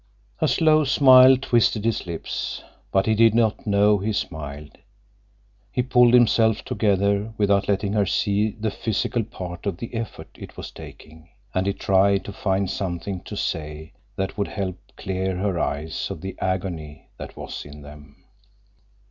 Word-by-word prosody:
A - - +2
slow 155 -1 +4
smile 130 -2 +7
twisted 120 -4 +1
his 115 -5 -1
lips, 85 -1 -5 0.3
but 95 0 +2
he 110 - +2
did 115 0 +4
not 110 -2 +1
know 105 0 +4
he 105 +3 -2
smiled. 75 -7 -6 0.9
He 125 - 0
pulled 125 -1 +5
himself 110 -2 +3
together 100 +1 0
without 100 -1 +2
letting 100 0 0
her 105 -3 +1
see 105 +2 +1
the 110 0 -1
physical 110 +2 -1
part 90 -3 -7
of 95 -4 -2
the 115 +5 -7
effort 115 -1 -6
it - - -12
was - - -7
taking. 80 +1 -13 0.2
And 95 +1 0
he 100 - +1
tried 100 0 +2
to 100 - -7
find 95 -1 0
something 90 0 -4
to - - -7
say 75 0 -4 0.2
that 95 +2 -4
would 100 - 0
help 95 -3 -4 0.2
clear 95 0 -2
her 95 -2 -1
eyes 75 +1 -3
of - - -6
the 95 +1 -6
agony 90 -5 -4
that - - -9
was - - -7
in 75 0 -12
them. 75 0 -14
100 Hz, 160 wpm, -23 LUFS, 90-110 Hz, 0.9 s, smile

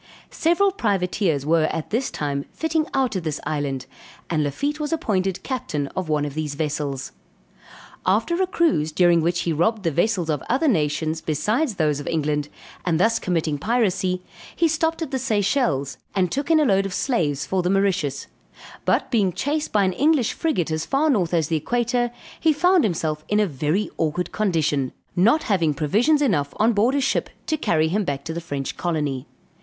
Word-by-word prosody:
Several 345 +5 +2
privateers 185 - 0
were 160 0 +3
at 155 0 -3
this 245 +4 0
time 140 -1 -3
fitting 320 -1 0
out 260 -5 0
at 185 - -2
this 155 -2 -2
island, 140 -3 -2 0.5
and 155 -2 +1
Lafitte 285 - -2
was 300 +1 -3
appointed 195 - -1
captain 190 - -2
of 185 -4 -4
one 150 -1 +1
of 145 - -5
these 150 -1 -3
vessels; 145 -3 -3 0.9
after 225 - +1
a 375 - +2
cruise 320 - +1
during 175 0 +4
which 170 +2 0
he 170 - 0
robbed 200 +7 +1
the 165 - +1
vessels 180 +2 +1
of 145 -3 -1
other 270 +7 +2
nations, 155 - 0
besides 210 - 0
those 150 -4 +1
of 145 - -7
England, 150 -2 -1 0.3
and 165 -3 +1
thus 225 +5 +3
committing 160 -5 -1
piracy, 190 -4 0 0.3
he 335 - +3
stopped 325 +1 0
at 300 - -6
the 265 - -1
Seychelles, 205 - 0 0.2
and 185 -3 +1
took 280 +2 -2
in 325 -1 +5
a 305 - +3
load 195 -4 +3
of 185 - -5
slaves 155 - 0
for 190 -1 0
the 180 - -1
Mauritius; 190 -8 0 0.6
but - - +1
being 205 -6 +2
chased 290 - -2
by 205 -2 +3
an 190 -1 +1
English 290 - +2
frigate 260 - -1
as 155 0 -1
far 295 +3 +2
north 185 -10 +1
as 165 -4 +1
the 160 - +2
equator, 240 - 0 0.3
he 320 - +4
found 355 +3 +4
himself 160 -6 -1
in 210 - +2
a 210 - +4
very 155 +5 -1
awkward 160 +3 -1
condition; 155 - 0 0.2
not 230 - +4
having 170 -8 +1
provisions 225 - +2
enough 145 - 0
on 225 +2 +3
board 225 +6 +2
his 280 - +1
ship 270 - 0 0.2
to 315 - 0
carry 160 - +1
him 205 +6 0
back 140 -5 -3
to 160 - -5
the 170 - -4
French 140 -4 -4
Colony. 150 -5 -2
180 Hz, 190 wpm, -23 LUFS, 155-245 Hz, 0.9 s, in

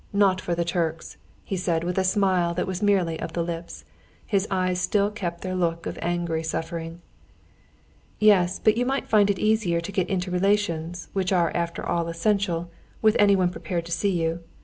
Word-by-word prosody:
Nor 200 -2 +3
for 175 -2 -2
the 170 0 -1
Turks...." 165 -2 -2 0.3
he 195 - -3
said, 170 -3 0
with 180 +1 -2
a - - +2
smile 185 -3 +2
that 180 - 0
was 185 0 -4
merely 185 -6 +2
of 165 - -5
the 170 - 0
lips. 170 0 -6 0.4
His 200 -1 0
eyes 185 -2 0
still 205 +1 +1
kept 175 -5 -4
their 185 -1 -3
look 170 -2 -1
of - - -5
angry 170 -1 -1
suffering. 165 +1 -4 1.2
"Yes; 195 -4 +4
but 215 0 +2
you 245 - +2
might 270 +2 -1
find 205 -2 +4
it 200 - +1
easier 215 -6 +1
to 170 +4 -6
get 185 -2 -1
into 185 -1 -1
relations, 180 -3 0
which 190 -1 0
are 175 -3 +2
after 170 -1 -2
all 170 -1 0
essential, 170 -1 0 0.3
with 215 0 +5
anyone 195 -3 +4
prepared 175 -1 -4
to 170 - -9
see 175 +1 +1
you. 165 +1 -1
180 Hz, 190 wpm, -25 LUFS, 170-200 Hz, 1.2 s, with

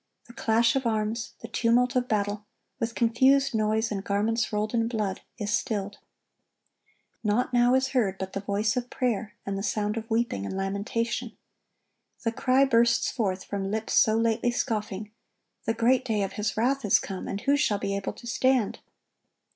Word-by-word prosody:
The 240 - -14
clash 230 +1 +2
of 265 -3 0
arms, 220 +1 -1
the 230 - -6
tumult 245 +2 +2
of 250 -1 +1
battle, 205 -1 -1 0.3
"with 230 0 -2
confused 265 +4 +3
noise, 220 +1 +1
and 195 -2 -3
garments 220 +4 0
rolled 210 +1 -1
in 230 -1 +1
blood,"(1109) 215 -5 -3 0.2
is 205 - -2
stilled. 205 -2 -2 1.2
Naught 230 +4 +1
now 245 +1 +4
is 265 0 +2
heard 215 -8 +1
but 190 0 -5
the - - -2
voice 205 +3 0
of 250 0 -2
prayer 230 -4 -2
and 195 0 -2
the - - -3
sound 210 +1 -1
of 225 +1 -5
weeping 225 - 0
and 190 - -4
lamentation. 200 +4 -2 0.9
The 230 - +1
cry 260 +3 +3
bursts 235 -2 +3
forth 195 -7 -1
from 195 -1 -3
lips 220 +2 -2
so 220 0 +5
lately 230 +1 +1
scoffing, 215 -4 -2 0.5
"The 225 - 0
great 245 +3 +3
day 220 -5 0
of 195 0 -4
His 210 0 -2
wrath 265 +4 +1
is 205 - +5
come; 190 -1 -5
and 200 - -3
who 280 +1 +3
shall 285 -8 +2
be 200 0 -2
able 200 - -3
to 245 - -14
stand?" 245 -2 +1
225 Hz, 180 wpm, -27 LUFS, 205-240 Hz, 1.2 s, so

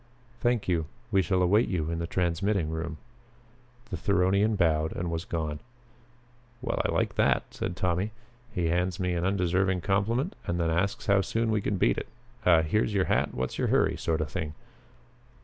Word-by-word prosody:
"Thank 120 -3 +1
you. 85 -4 +1 0.2
We 95 -2 +4
shall 90 +1 +1
await 105 +6 +3
you 80 -3 -1
in 85 - -2
the 85 - -2
transmitting 90 0 0
room." 80 0 -4 0.9
The 95 - -2
Theronian 100 +3 +2
bowed 80 -4 +2
and 85 -1 -2
was 80 +1 -3
gone. 80 -4 -3 1.0
"Well, - - -1
I - - 0
like - - 0
that," - - +3
said - - -3
Tommy. 90 +2 0 0.4
"He 90 - -1
hands 90 +1 0
me 90 -1 0
an 85 -1 -1
undeserved 95 -1 +1
compliment 115 - 0
and 85 0 -1
then 85 -1 +1
asks 90 +5 0
how 100 -1 +4
soon 115 +3 0
we 105 -1 +1
can 100 - -1
beat - - +2
it. - - -7 0.4
A 85 -3 +6
'here's 105 +6 +1
your 95 - +3
hat, - - +1
what's 65 +1 -3
your - - +1
hurry' - - +3
sort 80 -1 -1
of 75 -2 -3
thing." 75 +1 -4
90 Hz, 185 wpm, -28 LUFS, 80-100 Hz, 1.0 s, A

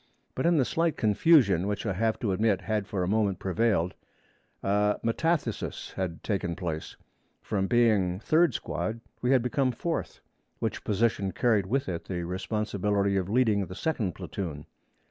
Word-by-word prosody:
But - - 0
in 170 -1 +4
the 135 - +3
slight 165 +1 0
confusion 105 - +4
which 105 +2 -2
I 100 - 0
have 110 +4 0
to 110 - 0
admit 105 0 +2
had 105 -2 -2
for 95 -3 -2
a - - -1
moment 100 -2 +1
prevailed, 95 -2 +1 0.7
a 105 +1 +2
metathesis 140 0 -1
had 90 -3 -4
taken 90 -5 -1
place: 80 -3 -5 0.5
from 95 -3 -1
being 105 -7 +3
third 160 +9 +3
squad 110 +2 -3 0.2
we 125 - 0
had 130 -3 +4
become 130 +1 +1
fourth, 165 +7 -3 0.4
which - - -3
position 105 -2 +1
carried 105 -4 +2
with 135 +6 0
it 85 -3 -4
the 90 -2 -3
responsibility 100 +2 -1
of 95 -1 -1
leading 105 -4 +2
the 90 - -8
second 110 - -1
platoon. 80 -6 -5
105 Hz, 160 wpm, -28 LUFS, 95-115 Hz, 0.7 s, in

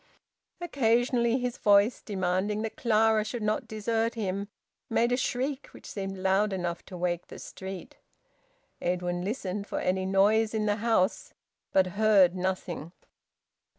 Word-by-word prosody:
Occasionally 245 -6 +2
his 250 -1 -3
voice, 205 +3 +4
demanding 195 +2 -1
that 225 - -4
Clara 220 -2 +3
should 220 +1 -5
not 215 0 -1
desert 225 +2 -1
him, 200 -2 -2 0.4
made 235 +1 +2
a - - +4
shriek 265 +2 -2
which - - -14
seemed 195 -1 -5
loud 190 +2 +2
enough 175 -2 -3
to 185 - -9
wake 175 0 -2
the - - -10
street. 190 -1 -8 0.8
Edwin 175 0 -1
listened 200 -1 -3
for - - -3
any 185 +1 0
noise 215 +3 +3
in 215 -1 0
the 205 0 +1
house, 220 -4 0 0.4
but 190 -1 +4
heard 195 -1 +4
nothing. 180 -3 -3
205 Hz, 140 wpm, -28 LUFS, 185-225 Hz, 0.8 s, voice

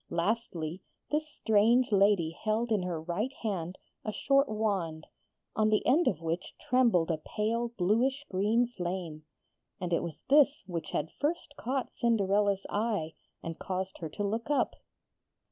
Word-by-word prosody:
Lastly, 170 -3 -2 0.3
this 305 +1 0
strange 230 +3 +3
lady 195 -5 +4
held 220 +2 0
in 210 -3 +3
her 180 -3 -2
right 180 +10 -2
hand 185 -4 -2 0.3
a 215 - -2
short 275 +5 +2
wand, 195 -8 -1 0.5
on 215 0 +3
the 215 - +2
end 320 +7 +4
of 165 -4 +1
which 165 +3 -3
trembled 230 -10 +3
a 160 - -1
pale 230 +3 -1
bluish 245 +10 +2
green 210 +6 +3
flame; 175 -8 -5 0.5
and 175 -1 -2
it - - +2
was 160 -2 -6
this 285 +1 +5
which 170 -4 -4
had 150 - -2
first 295 0 -1
caught 260 +1 -2
Cinderella's 205 -4 +2
eye 205 -7 -1 0.3
and 165 -1 -5
caused 190 0 -4
her 160 - -4
to 205 - -4
look 225 +6 -2
up. 295 - +1
205 Hz, 150 wpm, -30 LUFS, 175-235 Hz, 0.5 s, this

